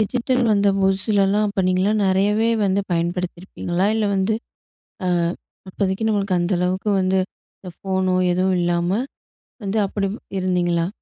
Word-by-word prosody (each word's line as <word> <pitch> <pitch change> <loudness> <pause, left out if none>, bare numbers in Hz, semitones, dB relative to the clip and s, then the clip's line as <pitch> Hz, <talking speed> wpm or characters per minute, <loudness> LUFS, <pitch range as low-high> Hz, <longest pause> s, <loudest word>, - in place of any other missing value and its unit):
Digital 250 +3 0
வந்த 200 0 +3
புதுசுலல்லாம், 195 +1 +2
அப்ப 200 -1 -1
நீங்கல்லாம் 195 +4 +2
நெறையவே 205 +4 +2 0.2
வந்து 195 +1 +2
பயன்படுத்தியிருப்பீங்களா? 175 +1 -2
இல்லை 215 -2 +1
வந்து, 195 +3 +1 0.7
"அ - - -1 0.6
அப்போதைக்கு, 195 +3 -1
நம்மளுக்கு 200 -3 +1
அந்த 175 +2 0
அளவுக்கு 185 +3 0
வந்து 190 0 +1 0.4
இந்த 185 - -9
ஃபோனோ 190 -1 0 0.2
எதுவும் 185 +1 +1
இல்லாம" 175 0 0 0.7
வந்து 200 +2 -2
அப்படி 195 0 -2 0.3
இருந்தீங்களா? 175 -2 +1
190 Hz, 125 wpm, -21 LUFS, 180-205 Hz, 0.7 s, வந்த